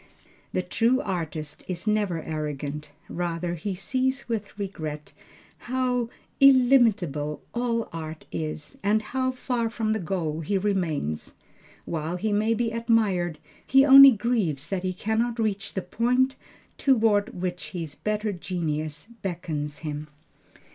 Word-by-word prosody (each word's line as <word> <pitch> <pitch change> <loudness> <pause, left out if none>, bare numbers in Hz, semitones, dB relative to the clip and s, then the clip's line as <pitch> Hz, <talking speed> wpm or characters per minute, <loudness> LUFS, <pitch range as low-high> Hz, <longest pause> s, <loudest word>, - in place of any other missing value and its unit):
The - - -1
true 240 +3 +2
artist 160 - -4
is 180 0 -4
never 205 -6 0
arrogant; 150 -1 -4 0.2
rather 170 0 -2
he 190 +3 -3
sees 260 +7 -1
with 215 -4 -4
regret 155 -7 -5 0.6
how 250 -2 0 0.3
illimitable 225 - +4
all 235 -1 0
art 160 -1 -6
is, 155 -1 -5
and 210 +2 +2
how 260 +3 -1
far 250 -2 -1
from 220 -1 -1
the 220 - -1
goal 165 -4 -2
he 195 +6 0
remains. 170 - -1 0.5
While 165 +1 -3
he 210 +3 -1
may 215 +2 +2
be 230 0 0
admired, 215 -8 +1 0.3
he 270 +1 +5
only 275 0 +11
grieves 205 - 0
that 195 -2 -1
he 185 0 -1
cannot 220 +5 -1
reach 215 -2 -2
the 190 - -2
point 250 +7 +1 0.4
toward 220 -8 +2
which 175 -4 -3
his 160 -3 -5
better 210 +6 -2
genius 155 -3 -3
beckons 160 -5 -4
him." 150 0 -4
195 Hz, 130 wpm, -26 LUFS, 160-230 Hz, 0.6 s, only